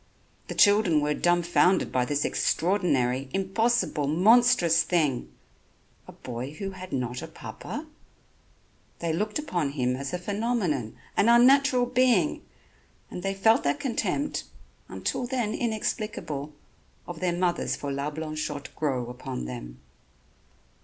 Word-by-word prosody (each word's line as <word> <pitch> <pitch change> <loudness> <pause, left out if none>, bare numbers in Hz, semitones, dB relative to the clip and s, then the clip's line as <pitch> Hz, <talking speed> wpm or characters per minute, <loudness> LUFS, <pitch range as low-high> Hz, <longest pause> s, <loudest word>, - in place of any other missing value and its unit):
The - - -6
children 205 -6 +5
were 150 0 0
dumbfounded 175 +2 +2
by 125 -1 +1
this 145 +3 -1
extraordinary, 140 -8 +1
impossible 195 -5 +1
monstrous 180 -1 +5
thing 145 - 0 0.8
a - - -9
boy 125 +3 -7
who 195 +3 -5
had 185 -1 -10
not 125 -1 -3
a 160 - -6
papa; 295 - -8 1.1
they 165 -2 -2
looked 210 +5 -1
upon 175 - -2
him 125 -3 0
as 135 +1 -5
a - - -2
phenomenon, 190 - -2 0.2
an 225 - +3
unnatural 255 +2 +5
being, 245 -9 +2 0.7
and 180 - -6
they 195 +1 -2
felt 225 +6 +4
that 290 - 0
contempt, 285 +2 -2 0.4
until 245 - -3
then 240 -4 -1
inexplicable, 210 - -3 0.6
of 175 -2 -7
their 175 -1 0
mothers 175 -1 0
for 145 - -5
La 140 +2 -2
Blanchotte 155 -2 -5
grow 130 -6 -1
upon 120 - -6
them. - - -8
175 Hz, 125 wpm, -27 LUFS, 140-220 Hz, 1.1 s, children